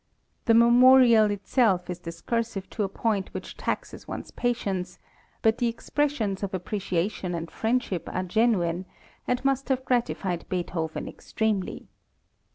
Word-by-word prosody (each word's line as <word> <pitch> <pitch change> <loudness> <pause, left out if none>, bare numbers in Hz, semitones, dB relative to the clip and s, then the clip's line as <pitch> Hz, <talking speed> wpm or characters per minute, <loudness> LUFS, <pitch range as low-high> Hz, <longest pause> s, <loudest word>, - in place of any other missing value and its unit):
The 230 - +5
memorial 235 -1 +7
itself 205 -2 +1
is 180 -1 -5
discursive 195 +5 -3
to - - -3
a 200 - 0
point 200 -1 -1
which - - -6
taxes - - -4
one's - - -6
patience, 200 -7 -2 0.5
but 225 +1 +3
the 240 - +2
expressions 235 -4 -1
of 195 -1 -3
appreciation 185 -1 -2
and 165 0 -5
friendship 225 -6 -1
are 185 - -2
genuine, 185 -3 +1 0.4
and 250 +2 -1
must 275 0 +1
have 260 -1 0
gratified 215 -8 -1
Beethoven 170 -3 -3
extremely. 215 -4 -2
210 Hz, 130 wpm, -26 LUFS, 185-240 Hz, 0.5 s, memorial